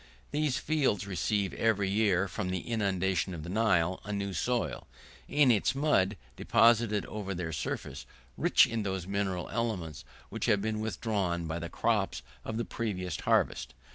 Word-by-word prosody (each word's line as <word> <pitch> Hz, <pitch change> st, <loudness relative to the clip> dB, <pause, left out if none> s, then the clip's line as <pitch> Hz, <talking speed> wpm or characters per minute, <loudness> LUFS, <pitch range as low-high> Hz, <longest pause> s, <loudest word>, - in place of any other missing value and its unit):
These 150 Hz, -3 st, +1 dB
fields 135 Hz, -11 st, +1 dB
receive, 100 Hz, +1 st, -1 dB
every 105 Hz, -3 st, +1 dB
year, 100 Hz, -2 st, +2 dB
from 95 Hz, 0 st, -3 dB
the 95 Hz, -1 st, -2 dB
inundation 95 Hz, -4 st, 0 dB
of 80 Hz, -, -7 dB
the 85 Hz, -, -7 dB
Nile, 95 Hz, -5 st, +2 dB
a 105 Hz, -, -6 dB
new 100 Hz, -1 st, -2 dB
soil, 120 Hz, +7 st, -1 dB, 0.4 s
in 145 Hz, -4 st, +4 dB
its 110 Hz, +2 st, +2 dB
mud 125 Hz, -9 st, +2 dB, 0.2 s
deposited 115 Hz, -2 st, +3 dB
over 100 Hz, -2 st, -5 dB
their 85 Hz, -2 st, -3 dB
surface, 75 Hz, -, -4 dB, 0.3 s
rich -, -, +5 dB
in 115 Hz, -1 st, -2 dB
those 95 Hz, -3 st, -3 dB
mineral 95 Hz, -2 st, -2 dB
elements 100 Hz, -, -3 dB, 0.3 s
which -, -, -3 dB
have 105 Hz, -, +4 dB
been 110 Hz, +1 st, -2 dB
withdrawn 100 Hz, -6 st, -1 dB
by 80 Hz, +1 st, -3 dB
the 85 Hz, 0 st, -5 dB
crops -, -, 0 dB, 0.2 s
of 110 Hz, -, -4 dB
the 115 Hz, -, -1 dB
previous 90 Hz, -7 st, -3 dB
harvest. -, -, +1 dB
100 Hz, 160 wpm, -30 LUFS, 90-110 Hz, 0.4 s, rich